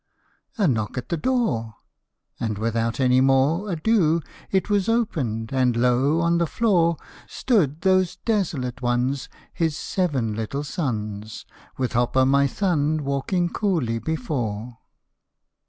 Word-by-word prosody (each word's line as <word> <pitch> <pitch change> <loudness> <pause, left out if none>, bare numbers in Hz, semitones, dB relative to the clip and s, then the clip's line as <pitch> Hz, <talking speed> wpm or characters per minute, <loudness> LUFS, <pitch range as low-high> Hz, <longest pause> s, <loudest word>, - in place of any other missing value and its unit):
"A 205 -5 +3
knock 110 -4 -1
at 125 0 -5
the - - 0
door." 150 - -1 0.6
And 110 -3 -2
without 115 +2 -1
any 130 -1 +4
more 135 +9 +2
Ado, 170 -2 +2 0.3
it 190 -2 +1
was 205 0 +1
opened 135 - -1
and, 125 -3 +2
lo! 125 +6 +2
on 170 0 +2
the 170 - +1
floor 170 -6 +2 0.3
Stood 165 - 0
those 185 -2 +2
desolate 155 - -2
ones, 125 +2 0 0.2
His 160 -3 -1
seven 140 - -1
little 115 +7 -3
sons, 110 - -4 0.3
With 130 -1 -2
Hop 120 +2 +1
o' 130 - +5
my 140 +1 +4
Thumb 155 -2 0
walking 140 +6 0
coolly 160 - 0
before 120 - -3
140 Hz, 130 wpm, -23 LUFS, 120-175 Hz, 0.6 s, o